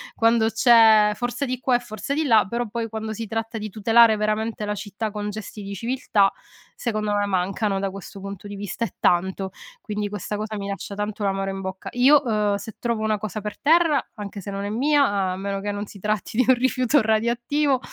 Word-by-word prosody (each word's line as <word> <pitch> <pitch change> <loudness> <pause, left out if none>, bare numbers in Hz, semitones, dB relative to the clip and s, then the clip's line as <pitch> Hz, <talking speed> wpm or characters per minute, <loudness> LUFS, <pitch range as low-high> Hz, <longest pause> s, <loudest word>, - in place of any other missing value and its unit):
quando 225 -1 +3
c'è 220 -2 +6
"Forza!" 245 +3 -2
di 255 -1 -3
qua 255 0 +2
e - - -7
"Forza!" 230 +2 -5
di 315 +2 0
là 220 -7 +5
però 235 +3 -2
poi, 230 +1 -3
quando 220 0 -4
si 225 +1 -5
tratta 225 +1 -3
di 215 0 -5
tutelare 225 +2 +5
veramente 215 +1 -1
la 210 0 -2
città 210 +1 -4
con 210 0 -4
gesti 210 0 -8
di 200 0 -6
civiltà, 230 -4 +1 0.4
secondo 215 -3 -2
me 205 0 +1
mancano 195 +1 0
da 195 0 -1
questo 195 +1 -9
punto 200 0 -8
di 205 - -7
vista, 205 +3 -3
e - - -8
tanto. 190 +2 +1 0.3
Quindi, 210 -2 -3
questa 210 +1 -4
cosa 215 0 -4
mi 200 -1 -5
lascia 200 0 -5
tanto 210 +1 -4
l'amaro 195 0 0
in 195 0 -4
bocca. 190 0 -6
Io, 270 +4 +6
uhm, 210 -3 +1
se 215 +1 -9
trovo 235 -2 -2
1 215 -1 +1
cosa 215 +1 -5
per 210 0 -6
terra, 320 -1 +3
anche 205 -2 -7
se 200 - -6
non 195 0 -4
è - - -3
mia, 280 +6 +3 0.2
a 185 - -3
meno 195 0 -3
che 205 +1 -3
non 205 0 -4
si 200 - -12
tratti 215 +2 -2
di 255 - +4
un 260 - +7
rifiuto 255 +2 +2
radioattivo, 240 +6 +1
215 Hz, 220 wpm, -23 LUFS, 200-235 Hz, 0.4 s, un